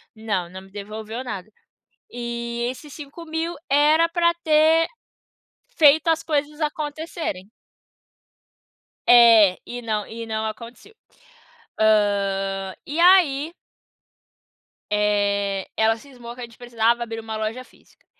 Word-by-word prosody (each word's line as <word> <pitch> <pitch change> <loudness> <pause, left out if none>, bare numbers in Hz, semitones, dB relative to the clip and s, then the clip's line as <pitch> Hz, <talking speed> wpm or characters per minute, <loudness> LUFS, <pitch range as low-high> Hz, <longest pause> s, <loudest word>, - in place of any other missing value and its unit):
Não, 205 -6 -3
não 185 +1 -10
me 190 - -18
devolveu 215 +4 -7
nada. 205 -5 -7 0.7
E 235 0 -4
esses 275 +3 -10
5.000, 320 +3 -5 0.2
era 300 +4 +4
pra 340 0 +2
ter 315 +1 +4 0.9
feito 310 +1 +5
as 325 -1 +2
coisas 300 0 -2
acontecerem. 300 - -4 1.6
É, 230 -6 +7
e 245 0 -7
não 215 -3 -3
e 230 +1 -7
não 220 0 -3
aconteceu. 230 - -9 0.9
Ah, 195 -3 +1
e 300 +3 -4
aí 340 -4 +4 1.4
eh, 205 -2 0
ela 220 0 +3
cismou 240 -2 -11
que 250 - -10
a - - -5
gente 235 -1 -12
precisava 235 -1 0
abrir 225 -1 -6
uma 220 0 -6
loja 220 +4 -4
física. - - -26
235 Hz, 115 wpm, -22 LUFS, 215-300 Hz, 1.6 s, É